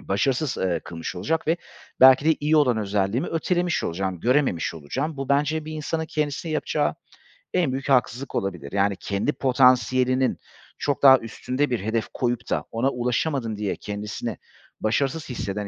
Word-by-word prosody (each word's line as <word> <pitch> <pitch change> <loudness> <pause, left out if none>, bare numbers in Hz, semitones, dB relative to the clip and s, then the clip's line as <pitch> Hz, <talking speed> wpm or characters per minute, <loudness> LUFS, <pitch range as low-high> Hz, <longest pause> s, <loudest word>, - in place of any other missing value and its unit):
başarısız, 130 +8 0
eee, 90 -2 0
kılmış 85 +1 -6
olacak 160 - -1
ve 165 - +3 0.4
belki 130 +2 +8
de 160 -1 +4
iyi 150 +2 +2
olan 130 -6 +4
özelliğimi 105 - 0
ötelemiş 175 +1 0
olacağım, 90 +1 -3
görememiş 125 - +1
olacağım. 130 - -4
Bu 135 -1 -5
bence 150 +2 +1
bir 155 - -7
insanın 160 +1 -3
kendisine 150 +1 -2
yapacağı 155 - 0 0.6
en 170 -7 +2
büyük 135 +2 -4
haksızlık 130 0 +1
olabilir. 90 -9 -3
Yani, 100 0 +1
kendi 100 +8 -1
potansiyelinin 130 0 +3 0.4
çok 140 -2 -2
daha 135 -1 +9
üstünde 125 +5 -2
bir 120 -2 0
hedef 110 +3 -1
koyup 120 -1 -2
da - - 0
ona 115 +4 +1
ulaşamadım 125 -2 -1
diye 105 -2 -2
kendisini 105 +2 -5 0.4
başarısız 140 +8 0
hisseden 105 -4 -4
130 Hz, 155 wpm, -24 LUFS, 105-145 Hz, 0.6 s, daha